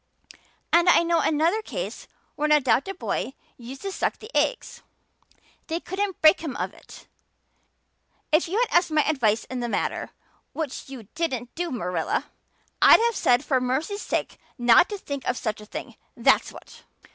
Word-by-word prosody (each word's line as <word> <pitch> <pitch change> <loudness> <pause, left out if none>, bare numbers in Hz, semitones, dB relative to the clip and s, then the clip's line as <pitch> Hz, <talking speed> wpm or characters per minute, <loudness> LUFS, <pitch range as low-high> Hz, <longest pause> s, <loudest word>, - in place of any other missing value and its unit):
And 345 +1 +5
I 345 - +6
know 335 0 +2
another 330 +8 +1
case - - -6 0.3
where 300 - 0
an - - 0
adopted 300 +6 +2
boy 270 - -3 0.2
used 255 +5 -10
to 395 - -3
suck - - -2
the 435 +3 -13
eggs - - -1 0.9
they 330 +1 -2
couldn't 385 +1 -3
break 310 +4 +6
him 310 -6 -5
of - - -3
it. - - -15 1.3
If 310 +3 +3
you 375 +5 -2
had 485 0 +2
asked 345 0 +4
my 305 -1 +2
advice 230 -8 +1
in 255 - -6
the 240 -1 -3
matter - - -2 0.4
which 295 -4 -5
you 260 -4 -8
didn't 260 -7 -3
do, 350 +1 -3
Marilla 180 - -2 0.5
I'd - - +8
have 465 0 +1
said 245 -3 +2
for 260 -3 +1
mercy's 295 +12 -2
sake - - -3 0.2
not 240 +5 +5
to 415 - -4
think 280 -7 -6
of 250 - 0
such 215 -3 -3
a 210 - -13
thing, - - -7 0.2
that's - - +3
what." - - -14
305 Hz, 170 wpm, -25 LUFS, 250-350 Hz, 1.3 s, I'd